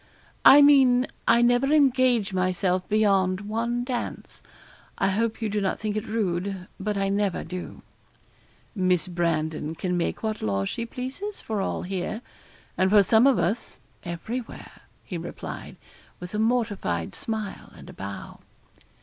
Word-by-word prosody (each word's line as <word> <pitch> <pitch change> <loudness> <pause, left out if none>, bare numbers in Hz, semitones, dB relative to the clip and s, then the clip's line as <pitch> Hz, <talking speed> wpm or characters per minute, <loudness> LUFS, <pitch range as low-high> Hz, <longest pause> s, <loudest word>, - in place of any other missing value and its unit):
'I 290 +1 +10
mean, 265 -3 +5 0.2
I 235 +1 +5
never 245 +3 +3
engage 255 -8 +3
myself 185 0 0
beyond 195 -3 +2
one 230 +3 -2
dance. 245 -1 -5 0.6
I 195 - +2
hope 225 +3 -1
you - - +1
do 210 0 -1
not 190 - -1
think 210 -1 -2
it 215 - -3
rude 195 -3 -2
but 205 +1 -2
I 195 0 +1
never 200 -2 0
do.' 180 +2 -7 0.9
'Miss 185 -4 +1
Brandon 160 -3 -1
can 180 +2 -2
make 170 - -2
what 220 -1 -2
laws 100 -2 -1
she 235 - -4
pleases 265 - -6
for 215 -3 -3
all - - -2
here, 195 +5 -4 0.6
and 185 - +4
for 205 0 +6
some 225 +6 +5
of 275 - +4
us 220 - -1 0.3
everywhere,' 220 +8 -6 0.2
he - - -5
replied, - - -7 0.4
with 180 +2 -8
a 210 - -1
mortified 210 - 0
smile 220 -3 -5
and - - -13
a - - -10
bow. 100 +1 -8
210 Hz, 150 wpm, -25 LUFS, 185-235 Hz, 0.9 s, I